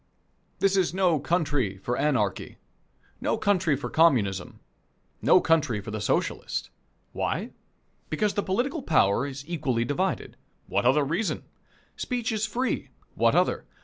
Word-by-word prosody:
This 195 0 +2
is 185 -2 +1
no 180 -5 +3
country 145 - 0
for 120 +6 -2
Anarchy, 125 -10 0 0.6
no - - 0
country 190 -7 +2
for 140 - -5
Communism, 110 - +2 0.6
no - - +6
country 150 -9 +2
for 105 +2 -7
the 110 -1 -4
Socialist. 105 - -1 0.4
Why? - - -2 0.6
Because 200 +6 0
the 205 - 0
political 245 - -1
power 130 - +2
is 140 0 -7
equally 130 -9 -1
divided. 185 +9 -2 0.3
What 120 - +1
other 145 +3 +4
reason? 170 +9 -1 0.5
Speech 245 -3 -2
is 220 0 0
free. 250 +4 -2 0.2
What - - +3
other? - - +1
155 Hz, 135 wpm, -26 LUFS, 125-195 Hz, 0.6 s, no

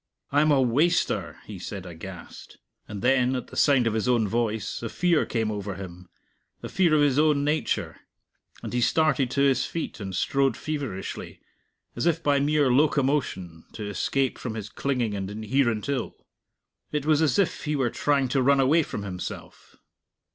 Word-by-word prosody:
"I'm 150 +2 +3
a 145 -2 +4
waster!" 145 +8 +1
he 105 -4 -8
said 95 +1 -7
aghast. 90 +1 -10 0.3
And 100 -2 -7
then, 130 0 +3
at 125 - -5
the - - -11
sound 135 -4 +4
of 115 - +1
his 110 +1 -1
own 120 -4 +2
voice, 110 0 -2
a 115 - -4
fear 175 +2 +1
came 110 -2 -1
over 100 -2 -4
him, 90 -2 -10 0.5
a - - -5
fear 175 -5 +3
of 150 - +4
his 145 -1 +3
own 150 -2 +3
nature; 150 +2 -1 0.7
and - - -6
he 125 - +1
started 140 -2 +2
to 140 - 0
his 135 -2 +3
feet 165 -4 -5
and 95 -3 -5
strode 135 +4 +1
feverishly, 140 -11 -5 0.6
as - - -1
if 165 0 +1
by 145 -1 +3
mere 145 -1 +2
locomotion, 130 - 0
to 105 - -6
escape 130 +7 -1
from 115 -3 -5
his 105 -2 -6
clinging 125 -6 -1
and 95 -1 -4
inherent 110 +2 0
ill. 135 -4 -2 0.8
It 150 -1 -2
was 155 0 +3
as 145 -5 +2
if 195 -4 0
he 150 0 0
were 130 -5 0
trying 140 -2 +1
to 135 +1 +1
run 140 +2 +4
away 145 +5 +4
from 105 -8 -5
himself. 90 -3 -8
130 Hz, 175 wpm, -26 LUFS, 105-145 Hz, 0.8 s, a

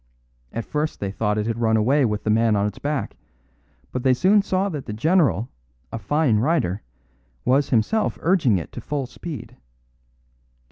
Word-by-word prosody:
At 115 - -4
first 150 +1 -2
they 100 -1 -3
thought 105 +1 -1
it 105 - 0
had 115 0 -2
run 110 -1 +3
away 130 +6 +3
with 105 -2 -2
the 110 - +1
man 110 0 +3
on 100 0 +1
its 105 0 -4
back; 145 -1 -2 0.8
but 125 - -2
they 130 0 +3
soon 195 +10 +4
saw 195 0 0
that 150 -10 -5
the 105 - -4
general, 140 - +2 0.4
a - - -4
fine 130 +2 +2
rider, 120 - +1 0.6
was 135 +2 +3
himself 135 - +1
urging 160 - +3
it 85 - -6
to 120 - -7
full 140 +2 -3
speed. 150 +4 -8
125 Hz, 175 wpm, -23 LUFS, 110-150 Hz, 0.8 s, soon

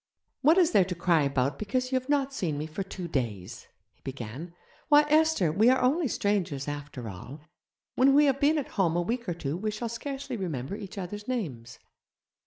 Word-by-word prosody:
'What 310 +6 +5
is 355 -2 +4
there 195 - +5
to 180 0 -4
cry 170 -2 +2
about 140 -1 0
because 255 +5 -2
you 260 - +3
have 255 +2 -18
not 280 -2 +1
seen 165 - -2
me 150 - -3
for 160 +5 -5
two 190 -2 -6
days?' 120 - -4 0.3
he - - -37
began; 135 +6 -7 0.3
'why, 295 0 +7
Esther, 310 - +3
we 215 +9 +4
are 260 - +4
only 280 +6 +2
strangers, 185 - -1
after 145 -4 -6
all. 110 +10 -9 0.5
When 270 +2 +4
we 295 +1 +6
have 275 -1 +2
been 300 +2 +3
at 290 - -3
home 175 -5 +1
a 175 - +2
week 235 +2 -3
or 175 - -2
two 150 -3 -3
we 215 +5 -2
shall 215 +2 -4
scarcely 270 +2 -5
remember 160 - -4
each 205 +1 -9
other's 205 +3 -6
names.' 155 - -4
195 Hz, 200 wpm, -28 LUFS, -, 0.5 s, why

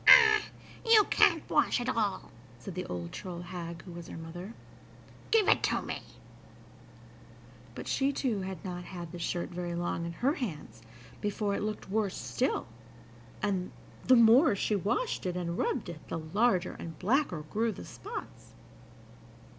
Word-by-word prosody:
"Ah! 435 -2 +9 0.4
you 455 -2 +7
can't - - +4
wash - - +3
at 245 - -3
all," 220 -6 -1 0.3
said 150 +10 -8
the 180 +1 -4
old 85 -1 -5
troll 175 -2 -6
hag, 170 -1 -7
who 180 - -10
was 170 -1 -8
her - - -8
mother. 175 +6 -8 0.7
"Give 445 -3 +4
it - - +5
to - - 0
me." - - -4 1.7
But - - -7
she 275 +1 +2
too 245 -7 -1
had 190 0 -6
not 180 -1 -4
had 175 -3 -7
the 175 - -7
shirt 170 +1 -2
very 175 -1 -4
long 170 -1 -2
in 170 - -5
her 260 - +1
hands 155 - -5 0.4
before 205 0 -1
it - - -1
looked 215 0 -3
worse 210 -2 0
still, - - -1 0.8
and, 190 -3 0 0.3
the 255 - +6
more 235 +2 +7
she 210 +2 0
washed 210 - -1
it 180 0 -2
and 170 -1 -2
rubbed - - -1
it, 170 -3 -9
the - - -3
larger 180 +3 +1
and 165 -1 -7
blacker 215 - +1
grew 225 +2 +1
the - - -8
spots. 430 +4 -8
190 Hz, 160 wpm, -31 LUFS, 175-230 Hz, 1.7 s, Ah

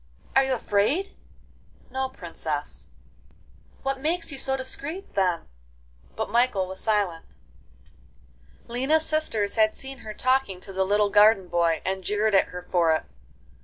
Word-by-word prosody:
'Are 270 - +6
you 265 0 0
afraid?' 255 - 0 0.8
'No, 265 0 -1
Princess.' 265 - -5 1.0
'What 270 0 -1
makes 330 +3 0
you 275 - -5
so 265 0 +1
discreet, 285 +8 -6
then?' 185 -3 +1 0.7
But - - -2
Michael 235 -5 +2
was 190 +1 -7
silent. 200 -7 0 1.4
XII 235 - -11
Lina's 300 +6 +2
sisters 225 -10 0
had 215 0 +3
seen 270 0 -7
her 215 -1 -8
talking 255 -7 +1
to 195 - -10
the 190 0 +1
little 205 +1 +2
garden 205 -2 +6
boy, 170 -2 +1
and 190 0 -2
jeered 210 +3 +1
at 195 - +5
her 180 0 -8
for 170 -3 +3
it. - - -2
215 Hz, 145 wpm, -26 LUFS, 190-265 Hz, 1.4 s, Are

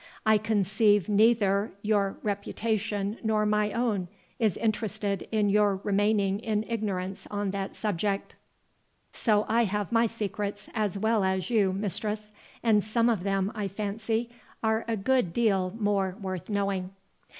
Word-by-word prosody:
I 220 -1 +5
conceive 210 -1 +2
neither 210 -1 +3
your 205 -2 +1
reputation 210 0 -2
nor 215 -1 +2
my 210 0 +2
own 220 -6 0 0.3
is 220 -5 +2
interested 210 -3 -1
in 210 -2 +2
your 205 -1 +4
remaining 205 -1 +2
in 215 -1 -1
ignorance 195 -4 -3
on 205 -1 -2
that 195 0 -4
subject. 200 -1 -2 0.8
So 215 -2 +2
I 235 +1 +3
have 205 0 -2
my 230 0 +4
secrets 205 -2 -4
as 210 -4 -1
well 220 0 +2
as 190 +3 0
you, 205 -5 +3
mistress; 210 +2 -3 0.3
and 215 -3 +4
some 230 +2 +2
of 220 -6 +1
them, 195 +1 0
I 210 -3 -2
fancy, 220 +4 -2 0.3
are 220 +1 +1
a 225 -1 0
good 230 -4 +1
deal 195 -6 +2
more 200 -3 +1
worth 185 -3 -5
knowing." 195 -2 -1
210 Hz, 140 wpm, -28 LUFS, 195-220 Hz, 0.8 s, I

